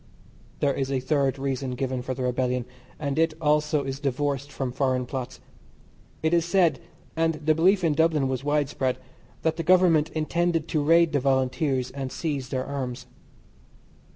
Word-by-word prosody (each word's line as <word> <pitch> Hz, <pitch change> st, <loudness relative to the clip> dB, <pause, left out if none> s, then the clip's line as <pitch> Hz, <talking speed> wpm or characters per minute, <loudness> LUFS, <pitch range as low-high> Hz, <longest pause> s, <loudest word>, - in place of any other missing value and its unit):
There 140 Hz, -1 st, +2 dB
is 135 Hz, 0 st, -2 dB
a 135 Hz, -, +1 dB
third 135 Hz, 0 st, 0 dB
reason 135 Hz, -1 st, -2 dB
given 130 Hz, 0 st, -2 dB
for 130 Hz, +1 st, -4 dB
the 130 Hz, -, -4 dB
rebellion, 125 Hz, -1 st, 0 dB, 0.3 s
and 145 Hz, 0 st, -2 dB
it 165 Hz, -1 st, +2 dB
also 150 Hz, -1 st, +2 dB
is 135 Hz, 0 st, -4 dB
divorced 140 Hz, 0 st, -2 dB
from 130 Hz, -2 st, -3 dB
foreign 130 Hz, -1 st, 0 dB
plots. 130 Hz, 0 st, -5 dB, 0.8 s
It 160 Hz, +1 st, +2 dB
is 170 Hz, -1 st, +4 dB
said, 170 Hz, -6 st, +2 dB, 0.4 s
and 165 Hz, 0 st, +1 dB
the 155 Hz, +1 st, +1 dB
belief 185 Hz, +4 st, +3 dB
in 160 Hz, -3 st, +3 dB
Dublin 155 Hz, -3 st, +2 dB
was 130 Hz, 0 st, -3 dB
widespread, 145 Hz, -3 st, 0 dB, 0.5 s
that 160 Hz, -1 st, +1 dB
the -, -, -1 dB
Government 170 Hz, -3 st, +4 dB
intended 165 Hz, +1 st, 0 dB
to 155 Hz, -4 st, +1 dB
raid 165 Hz, +2 st, +4 dB
the 145 Hz, -, +3 dB
Volunteers 130 Hz, 0 st, 0 dB
and 135 Hz, -2 st, -5 dB
seize 140 Hz, -6 st, -3 dB
their 130 Hz, 0 st, -2 dB
arms. 130 Hz, -3 st, -4 dB
140 Hz, 165 wpm, -26 LUFS, 130-160 Hz, 0.8 s, is